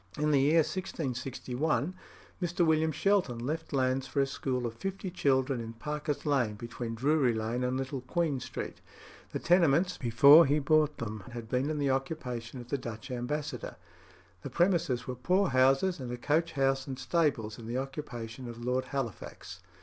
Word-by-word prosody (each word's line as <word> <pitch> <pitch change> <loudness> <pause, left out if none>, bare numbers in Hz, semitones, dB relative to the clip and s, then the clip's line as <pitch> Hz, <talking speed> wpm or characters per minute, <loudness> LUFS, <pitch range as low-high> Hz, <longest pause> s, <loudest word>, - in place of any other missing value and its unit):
In 150 0 +1
the 140 -2 +4
year 155 +4 +5
1661 140 -1 -2 0.5
Mr. 175 0 +1
William 160 0 +3
Shelton 185 -8 +1
left 155 +7 -4
lands 130 -1 +1
for 140 - -2
a 135 - +4
school 130 -1 -2
for 120 -1 -2
fifty 190 - -5
children 135 -6 +1
in 115 0 -6
Parker's 150 +3 -4
Lane, 130 -8 +1
between 115 +1 -5
Drury 135 -1 +2
Lane 115 +3 -2
and 125 +1 0
Little 135 0 -3
Queen 150 +1 -1
Street. - - -6 0.5
The - - -2
tenements, 175 0 +3
before 140 +7 +7
he 145 +2 +3
bought 150 +1 +2
them, 110 -1 -5
had 120 -2 -6
been 130 +5 0
in 155 - -1
the 140 -2 +1
occupation 130 -3 -3
of 120 0 -10
the 140 - -1
Dutch 120 +2 -7
ambassador. 125 +5 -4 0.7
The - - -6
premises 170 -9 +1
were 130 - -3
poor 180 +9 +1
houses, 135 +8 +3
and 125 -2 -5
a 125 - -4
coach 160 +7 0
house 135 -1 +1
and 135 -1 -5
stables 135 -7 0
in 115 - -9
the 120 +2 -2
occupation 130 -3 -6
of 115 - -8
Lord 125 +1 0
Halifax. 120 -9 -5
135 Hz, 175 wpm, -30 LUFS, 125-155 Hz, 0.7 s, before